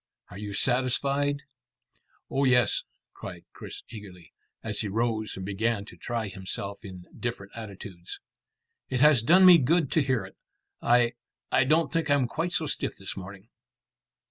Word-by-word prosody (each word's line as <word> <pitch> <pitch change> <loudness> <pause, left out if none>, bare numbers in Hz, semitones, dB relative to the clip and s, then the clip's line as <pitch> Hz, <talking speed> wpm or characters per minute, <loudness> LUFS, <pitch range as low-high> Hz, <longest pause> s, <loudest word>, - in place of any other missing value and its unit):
Are - - -9
you 105 -1 -5
satisfied?" 135 +5 +1 0.8
"Oh 135 - 0
yes," 125 -2 +4 0.3
cried 90 -2 -9
Chris - - -9
eagerly, 95 -7 -11 0.3
as 105 -2 0
he 105 - 0
rose 110 0 -1
and 95 - -5
began 105 +1 -1
to - - -12
try 115 -3 -3
himself 100 +2 -6
in 95 -3 -9
different 115 -5 -5
attitudes. 100 -5 -8 0.7
"It 130 -1 -1
has 150 -5 +6
done 180 +10 +6
me 180 -2 +9
good 155 +2 +2
to 160 - +3
hear 130 -7 0
it. 95 - -13 0.5
I 120 0 +4 0.4
I 130 - +4
don't 160 +5 +2
think 165 -2 0
I'm 140 -3 +3
quite 165 +8 -2
so 165 -2 0
stiff 150 - -2
this 95 - -6
morning." 95 +3 -10
115 Hz, 155 wpm, -27 LUFS, 100-140 Hz, 0.8 s, me